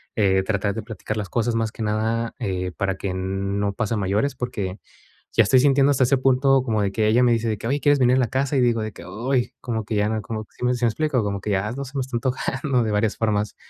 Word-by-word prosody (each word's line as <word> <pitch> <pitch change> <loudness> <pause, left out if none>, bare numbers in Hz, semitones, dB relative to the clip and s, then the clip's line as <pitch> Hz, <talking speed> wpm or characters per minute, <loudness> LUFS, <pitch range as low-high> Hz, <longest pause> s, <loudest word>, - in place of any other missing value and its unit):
eh, 95 -3 +3
tratar 100 0 -1
de 115 - -4
platicar 110 -1 -5
las 105 -3 -4
cosas 120 0 0
más 115 -1 0
que 110 - -6
nada, 110 +2 -1
eh, 95 -5 -2
para 100 -2 -1
que 95 -1 -3
no 100 +2 -2
pase 110 +2 -2
a - - -1
mayores. 105 +8 0
Porque 100 -6 -4 0.6
ya 115 - +6
estoy 120 +6 +4
sintiendo 140 +1 +4
hasta 135 -2 +3
ese 135 +2 +3
punto 135 +1 +3
como 110 -4 0
de 100 -1 0
que 110 +1 +1
ella 120 +4 +4
me 120 - +4
dice 115 0 0
de 110 - -1
que: 110 - -9
"Oye, 140 +4 0
¿quieres 145 -1 +4
venir 125 0 +4
en - - +3
la 125 - +1
casa?". 135 +2 0
Y 130 - +3
digo 120 -2 +2
de 110 0 -4
que, - - -11 0.3
ay, 125 -2 +1
como 115 -3 -3
que 110 - -3
ya 105 0 +2
no 110 0 -1
como 110 +1 -5
que, - - -39
¿sí - - -3
me 125 - +3
sí 120 0 0
me - - +4
explico? 135 -1 0
Como 100 -1 -2
que 105 - -4
ya 100 +2 0
no 140 +1 -5
se 135 +2 -8
me - - +1
está 130 -2 -3
antojando 130 +1 -1
de 110 - -1
varias 105 +1 +1
formas. 105 -2 0
110 Hz, 280 wpm, -23 LUFS, 105-125 Hz, 0.6 s, ya